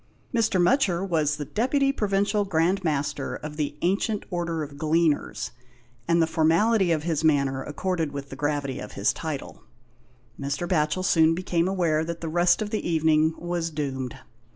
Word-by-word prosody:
Mr. 225 Hz, -5 st, +2 dB
Mutcher 190 Hz, -3 st, +2 dB
was 155 Hz, -5 st, +1 dB
the 145 Hz, 0 st, -5 dB
Deputy 275 Hz, -, +1 dB
Provincial 205 Hz, -3 st, +1 dB
Grand 185 Hz, +1 st, +1 dB
Master 145 Hz, -3 st, -1 dB
of 150 Hz, 0 st, -7 dB
the 145 Hz, -1 st, -3 dB
Ancient 200 Hz, +4 st, 0 dB
Order 170 Hz, -2 st, -2 dB
of 145 Hz, -1 st, -8 dB
Gleaners, 160 Hz, 0 st, +1 dB, 0.6 s
and 170 Hz, 0 st, +3 dB
the 165 Hz, -, +5 dB
formality 170 Hz, +5 st, +3 dB
of 155 Hz, -2 st, +1 dB
his 165 Hz, -2 st, -1 dB
manner 140 Hz, -4 st, +2 dB
accorded 165 Hz, +1 st, -2 dB
with 140 Hz, -1 st, -6 dB
the -, -, -6 dB
gravity 145 Hz, -1 st, -2 dB
of -, -, -8 dB
his -, -, +1 dB
title. -, -, -6 dB, 0.8 s
Mr. 140 Hz, +5 st, -2 dB
Batchel 170 Hz, +1 st, +1 dB
soon 165 Hz, -2 st, +4 dB
became 175 Hz, -1 st, 0 dB
aware 170 Hz, -5 st, +1 dB
that 170 Hz, +1 st, -5 dB
the 165 Hz, -, -4 dB
rest 175 Hz, +6 st, +3 dB
of 210 Hz, -, -6 dB
the 215 Hz, -5 st, -2 dB
evening 160 Hz, -1 st, +3 dB
was 175 Hz, -1 st, -2 dB
doomed. 135 Hz, -5 st, -4 dB
165 Hz, 165 wpm, -25 LUFS, 150-185 Hz, 0.8 s, the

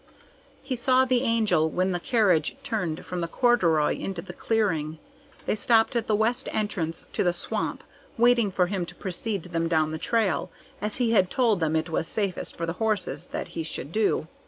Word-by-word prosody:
He 265 Hz, -1 st, -2 dB
saw 255 Hz, +2 st, +3 dB
the 255 Hz, -1 st, +2 dB
Angel 215 Hz, -10 st, +2 dB
when 185 Hz, +4 st, 0 dB
the 175 Hz, -, -1 dB
carriage 185 Hz, -7 st, +2 dB
turned 180 Hz, -7 st, -3 dB
from 180 Hz, -, -4 dB
the 170 Hz, -, -1 dB
corduroy 170 Hz, -, +3 dB
into 185 Hz, -3 st, -5 dB
the 175 Hz, -, -9 dB
clearing. 170 Hz, -9 st, 0 dB, 0.5 s
They -, -, +1 dB
stopped 225 Hz, +2 st, +3 dB
at 235 Hz, -2 st, 0 dB
the 215 Hz, -, +2 dB
west 235 Hz, +5 st, 0 dB
entrance 180 Hz, -7 st, -2 dB
to -, -, +1 dB
the 175 Hz, -2 st, +2 dB
swamp, 175 Hz, -, -3 dB, 0.3 s
waiting 235 Hz, -2 st, +4 dB
for 185 Hz, -1 st, +2 dB
him 185 Hz, 0 st, -2 dB
to 175 Hz, -, -10 dB
precede 195 Hz, +1 st, -3 dB
them 165 Hz, -2 st, -2 dB
down 155 Hz, -2 st, +2 dB
the 160 Hz, -, -4 dB
trail, 200 Hz, -10 st, 0 dB, 0.3 s
as 210 Hz, 0 st, -2 dB
he 240 Hz, -2 st, +1 dB
had 190 Hz, -5 st, +4 dB
told 230 Hz, -7 st, +2 dB
them 160 Hz, -1 st, 0 dB
it 160 Hz, +1 st, -1 dB
was 160 Hz, -, 0 dB
safest 200 Hz, -4 st, -2 dB
for 170 Hz, -, -2 dB
the 165 Hz, -, -2 dB
horse 215 Hz, -3 st, -1 dB
that -, -, -5 dB
he 165 Hz, -, -4 dB
should 160 Hz, -2 st, -5 dB
do. 210 Hz, -6 st, +1 dB
190 Hz, 195 wpm, -26 LUFS, 165-225 Hz, 0.5 s, waiting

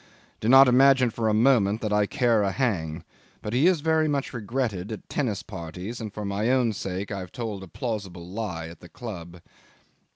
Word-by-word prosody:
Do 110 Hz, -, -1 dB
not 135 Hz, +1 st, +9 dB
imagine 130 Hz, -1 st, +5 dB
for 110 Hz, 0 st, -1 dB
a -, -, +2 dB
moment 110 Hz, -3 st, +3 dB
that 105 Hz, -2 st, -1 dB
I 105 Hz, -1 st, +3 dB
care 120 Hz, -5 st, +2 dB
a 100 Hz, -1 st, +1 dB
hang; 85 Hz, -, -1 dB, 0.4 s
but 105 Hz, -, -4 dB
he 135 Hz, +7 st, +4 dB
is 180 Hz, -5 st, +3 dB
very 160 Hz, 0 st, +2 dB
much 140 Hz, -3 st, -2 dB
regretted 115 Hz, -4 st, -3 dB
at 110 Hz, -, -7 dB
tennis 110 Hz, -9 st, -2 dB
parties, 95 Hz, +4 st, -7 dB
and 110 Hz, -2 st, -5 dB
for 105 Hz, 0 st, -6 dB
my 100 Hz, +3 st, -1 dB
own 125 Hz, -3 st, +2 dB
sake 95 Hz, 0 st, -4 dB
I've 95 Hz, -3 st, -5 dB
told 110 Hz, -5 st, -5 dB
a 95 Hz, -, -9 dB
plausible 95 Hz, -5 st, -5 dB
lie 90 Hz, -5 st, -4 dB
at 80 Hz, 0 st, -12 dB
the 85 Hz, -, -14 dB
club. 90 Hz, -7 st, -8 dB
110 Hz, 195 wpm, -26 LUFS, 95-125 Hz, 0.4 s, not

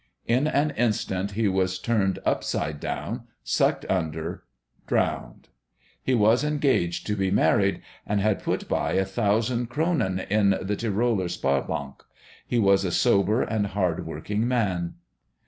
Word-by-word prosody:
In 125 Hz, +6 st, +2 dB
an 150 Hz, 0 st, +1 dB
instant 105 Hz, -6 st, -1 dB
he 110 Hz, +1 st, +1 dB
was 95 Hz, -1 st, +1 dB
turned 95 Hz, -2 st, 0 dB
upside 75 Hz, -1 st, -1 dB
down, -, -, -4 dB, 0.2 s
sucked -, -, +1 dB
under, 80 Hz, -1 st, -2 dB, 0.5 s
drowned. -, -, -1 dB, 0.5 s
He 130 Hz, -, +1 dB
was 110 Hz, +4 st, +4 dB
engaged 140 Hz, -, +1 dB
to 105 Hz, -, -1 dB
be 95 Hz, -2 st, 0 dB
married, 95 Hz, +1 st, +2 dB, 0.2 s
and 105 Hz, 0 st, +1 dB
had 105 Hz, 0 st, +1 dB
put -, -, -2 dB
by -, -, 0 dB
a 95 Hz, -, +2 dB
thousand 115 Hz, +4 st, 0 dB
kronen 120 Hz, -, 0 dB
in 100 Hz, -2 st, +3 dB
the 100 Hz, +2 st, -2 dB
Tiroler 110 Hz, -3 st, 0 dB
Sparbank. 70 Hz, -2 st, -2 dB, 0.5 s
He 120 Hz, -, 0 dB
was 100 Hz, -3 st, +4 dB
a 95 Hz, -, 0 dB
sober 105 Hz, +2 st, +3 dB
and 105 Hz, -2 st, -1 dB
hard 90 Hz, -5 st, -1 dB
working 105 Hz, +8 st, -2 dB
man.... 95 Hz, -9 st, 0 dB
100 Hz, 140 wpm, -25 LUFS, 95-115 Hz, 0.5 s, was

